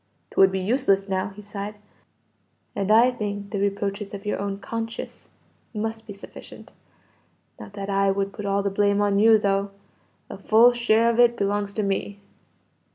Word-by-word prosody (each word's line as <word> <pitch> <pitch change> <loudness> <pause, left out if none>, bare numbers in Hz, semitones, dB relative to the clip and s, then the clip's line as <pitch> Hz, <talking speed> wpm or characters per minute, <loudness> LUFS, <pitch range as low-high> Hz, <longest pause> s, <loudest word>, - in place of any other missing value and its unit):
"'Twould 195 0 +4
be 190 - -2
useless 195 -1 +1
now," 190 0 -1
he 205 +1 -13
sighed, 205 +1 -6 1.0
"and 200 0 -2
I 230 +4 +6
think 205 -3 -5
the 205 - -2
reproaches 200 0 -2
of 200 +1 -10
your 210 - -2
own 200 0 -3
conscience 225 +2 -6 0.5
must 220 +1 -4
be - - -7
sufficient. 200 - -13 0.9
Not - - -11
that 200 -1 -6
I 195 0 +1
would 195 0 -1
put 210 -2 -6
all 200 0 0
the 200 - -1
blame 200 0 +2
on 200 -1 +2
you, 220 +1 +6
though. 200 -1 0 0.6
A - - -9
full 230 +3 +5
share 235 -1 +2
of 235 - -3
it 240 -1 +5
belongs 205 0 -1
to 215 - -2
me." 200 +1 -3
205 Hz, 170 wpm, -24 LUFS, 195-220 Hz, 1.0 s, I